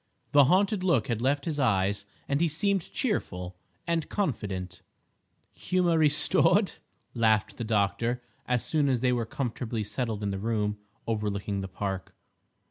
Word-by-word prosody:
The 145 -1 +7
haunted 190 - +3
look 170 -6 +2
had 115 -2 -1
left 140 +3 +1
his 155 -3 -2
eyes, 100 -4 +1 0.2
and 140 +2 +1
he 170 - +4
seemed 190 +4 0
cheerful 90 - -2 0.3
and 165 -2 -1
confident. 105 - -3 0.7
"Humour 180 -2 +1
restored?" 155 -1 +4 0.4
laughed 110 -3 +2
the - - -3
doctor, 115 +3 0 0.2
as 125 -1 0
soon 150 -3 +2
as 125 -3 +1
they 125 -1 +3
were 120 -2 -1
comfortably 120 -3 -3
settled 110 -1 -3
in 100 - 0
the 95 - -3
room 105 -1 -1 0.3
overlooking 105 -2 -2
the 95 - -4
Park. 95 -1 -4
115 Hz, 145 wpm, -28 LUFS, 105-150 Hz, 0.7 s, The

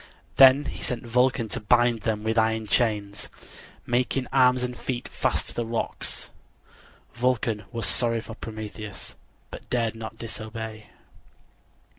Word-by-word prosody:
Then 135 +2 +8
he - - -5
sent 120 -1 -3
Vulcan 125 0 +2
to - - -3
bind 120 0 +3
him 105 -2 0
with 110 +1 0
iron 110 -1 +2
chains, 105 -2 0 0.6
making 125 +2 +1
arms 125 -1 +5
and 125 0 -3
feet 125 0 -4
fast - - -1
to - - -8
the 120 - -1
rocks. 115 0 -3 0.8
Vulcan 120 -3 0
was 115 -4 -2
sorry 115 +3 +1
for 115 0 -8
Prometheus, 110 -3 -7 0.4
but - - -10
dared 115 -2 +1
not 110 0 -8
disobey. 110 -1 -6
115 Hz, 135 wpm, -26 LUFS, 110-125 Hz, 0.8 s, Then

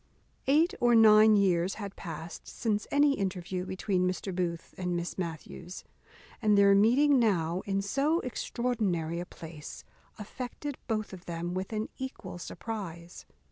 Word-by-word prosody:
_ - - -40 0.4
Eight 310 +6 +4
or 240 -1 +4
nine 215 -1 +7
years 185 -2 +2
had 200 -3 -7
past 165 -1 -8
since 210 -3 -2
any 285 0 +4
interview 185 -4 -3
between 185 -1 0
Mr. 185 +1 -4
Booth 170 -2 -3
and 180 -1 -2
Miss 175 0 -3
Matthews; 175 +1 -6 0.6
and 210 -2 +4
their 200 0 +6
meeting 255 +8 +5
now 180 -6 +1
in 195 0 0
so 280 - +1
extraordinary 210 -10 -2
a 175 - -5
place 160 -3 -9 0.3
affected 250 +6 -6
both 215 -3 -2
of 185 -1 -10
them 170 +1 -4
with 185 +3 -3
an 215 0 -2
equal 225 -9 -6
surprize. 175 -5 -7
195 Hz, 145 wpm, -30 LUFS, 175-225 Hz, 0.6 s, nine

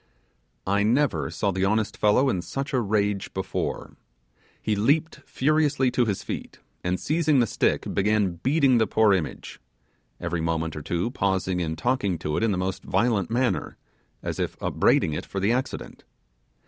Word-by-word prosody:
I 100 +1 +2
never 125 +6 +1
saw 100 - -1
the 95 +1 0
honest 110 +1 0
fellow 105 +6 +3
in 95 -9 0
such 135 - -5
a 130 - +2
rage 100 -2 0
before. 95 0 -3 0.6
He 110 - -1
leaped 145 +10 +1
furiously 145 -2 +2
to 120 - +2
his 100 -4 -2
feet, - - -6 0.3
and 90 +1 -1
seizing 155 -2 +2
the 120 - +4
stick, - - 0
began 100 -3 +1
beating 135 -3 +3
the 110 - +2
poor 110 -2 +4
image: 90 -5 -3 0.6
every 85 -1 -2
moment, 80 -1 -1
or 75 - -5
two 85 +9 -2
pausing 95 -5 0
and 80 -1 -2
talking 120 -8 0
to 75 -1 -3
it - - 0
in 115 -1 +2
the 95 - 0
most 95 +1 -2
violent 110 -6 +1
manner, 125 +2 -1 0.5
as - - -4
if - - -2
upbraiding 80 - +2
it - - -5
for 100 - -4
the 100 +4 +2
accident. 125 +2 -3
105 Hz, 170 wpm, -25 LUFS, 95-125 Hz, 0.6 s, the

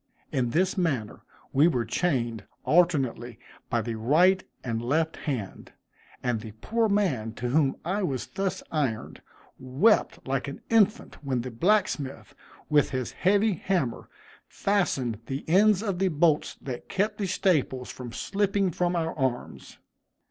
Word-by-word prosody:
In 125 -3 0
this 185 +8 +1
manner 130 - -1 0.3
we 145 +4 +5
were 125 -8 0
chained 120 - -1 0.2
alternately 135 -9 +2 0.3
by 115 -1 0
the 115 - -3
right 160 +12 +3 0.2
and 115 -2 -2
left 160 +6 0
hand; 125 -10 -5 0.5
and 120 -3 0
the 110 -2 -9
poor 220 - 0
man 145 - 0
to 120 +1 -3
whom 140 0 +2
I 195 +5 0
was 135 -9 -2
thus 195 -1 -3
ironed, 135 -8 -2 0.4
wept 135 - +2
like 135 0 -1
an 140 - -7
infant 220 -6 +2
when 130 -3 -1
the 125 +1 -6
blacksmith, 160 - 0 0.3
with 150 -1 +3
his 130 -2 -3
heavy 205 +3 +2
hammer, 170 -8 -2 0.4
fastened 135 - 0
the 135 +2 -5
ends 200 +4 +4
of 195 -5 -2
the 195 - +3
bolts 155 -2 +2
that 125 -3 -6
kept 210 +2 -1
the 200 - -1
staples 150 -9 0
from 125 -2 -8
slipping 200 - 0
from 175 +2 0
our 165 -1 -1
arms. 130 -4 -3
150 Hz, 145 wpm, -27 LUFS, 125-190 Hz, 0.5 s, we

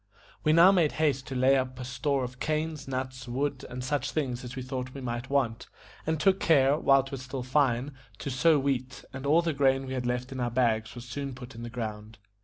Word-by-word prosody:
We 155 - +4
now 170 +4 +8
made 170 -6 +3
haste 140 -4 0
to 135 - -5
lay 130 +2 +4
up 130 -1 -1
a 125 - -5
store 135 +2 -1
of 125 0 -6
canes, 155 -1 -2
nuts, 130 -1 -4
wood, 135 +2 -2
and 125 0 -5
such 135 +1 -1
things 130 -5 -2
as 125 0 -7
we 130 - -4
thought 130 0 -5
we 135 - -6
might 120 0 -4
want; 130 -5 0 0.4
and 160 -1 0
took 190 +4 +3
care, 140 -3 +4
while 135 -3 +4
it 135 - -11
was 135 -2 -5
still 130 -1 -5
fine, 130 0 +1 0.2
to 140 - -4
sow 155 +5 +4
wheat, 135 -2 -2
and 135 +1 -5
all 160 +4 +4
the 165 -2 0
grain 135 -1 +2
we 130 - -5
had 125 -2 -2
left 125 +2 -2
in 130 - -5
our 120 -1 0
bags 115 -2 +1
was 120 0 -8
soon 135 +1 -5
put 125 0 -10
in 115 - -9
the 120 - -5
ground. 110 -2 -6
130 Hz, 235 wpm, -28 LUFS, 125-140 Hz, 0.4 s, now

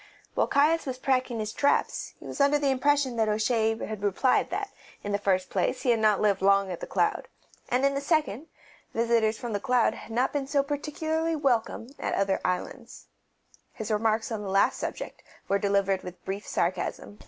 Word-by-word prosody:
While - - +1
Caius 300 +3 +3
was 255 -1 -3
packing 255 -2 0
his 215 0 -3
traps 285 - 0
he - - -13
was - - -4
under 285 +1 +4
the 285 -2 +1
impression 265 -1 +1
that 220 -1 +2
O'Shea 220 +1 +1
had 215 -2 -6
replied 205 +6 +2
that, - - -3 0.3
in 205 - -3
the 200 - 0
first 185 -2 0
place, 255 -1 0
he 250 - +3
had 230 - +2
not 215 -2 +3
lived 200 -3 +2
long 195 0 +3
at 175 - -5
The - - -6
Cloud, - - 0 0.4
and, 255 +2 +2
in 275 - +3
the 275 - -2
second, 305 - 0 0.5
visitors 230 -1 +2
from 240 -2 -5
The 205 - 0
Cloud 245 +2 +2
had - - -11
not 245 +4 +1
been 280 -2 -2
so 280 0 +2
particularly 315 +3 -2
welcome 245 -6 0
at - - -2
the - - -1
other 195 -1 +1
islands. 230 +7 -4 0.6
His 220 0 -5
remarks 220 +3 +1
on 220 -2 -3
the 200 - -5
last 195 +1 +2
subject - - -5 0.3
were 200 +1 +2
delivered 200 -1 +1
with 180 0 -10
brief 195 +1 -4
sarcasm. 185 +3 -2
225 Hz, 200 wpm, -27 LUFS, 205-275 Hz, 0.6 s, under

